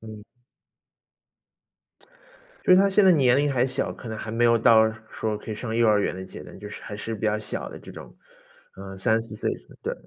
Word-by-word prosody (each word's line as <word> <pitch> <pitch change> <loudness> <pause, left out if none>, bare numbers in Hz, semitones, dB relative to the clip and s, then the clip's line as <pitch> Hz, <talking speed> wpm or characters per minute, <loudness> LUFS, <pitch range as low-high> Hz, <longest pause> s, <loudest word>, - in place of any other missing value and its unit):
嗯。 110 -1 -10 2.4
就 - - +5
是 185 - +8
他 200 - +4
现 195 +1 +4
在 190 - +7
年 130 -7 +4
龄 145 0 +1
还 125 -1 +2
小， 130 - -2
可 120 - -10
能 110 - -5
还 110 - -6
没 115 +2 +1
有 115 0 +5
到 110 -1 +5 0.2
说 110 -1 -3
可 105 - -9
以 110 - -3
上 110 +1 -5
幼 115 0 +3
儿 105 -1 +4
园 - - -1
的 95 0 -7
阶 95 - -10
段， - - -12
就 105 +1 -8
是 - - -9
还 105 - -7
是 115 +2 -5
比 105 - -10
较 105 - +1
小 110 - -5
的 - - -10
这 - - -12
种， - - -11 0.6
呃， 95 0 -9
3-4 110 +3 0
岁 - - -2 0.3
对， - - -2
110 Hz, 230 characters per minute, -25 LUFS, 105-120 Hz, 2.4 s, 是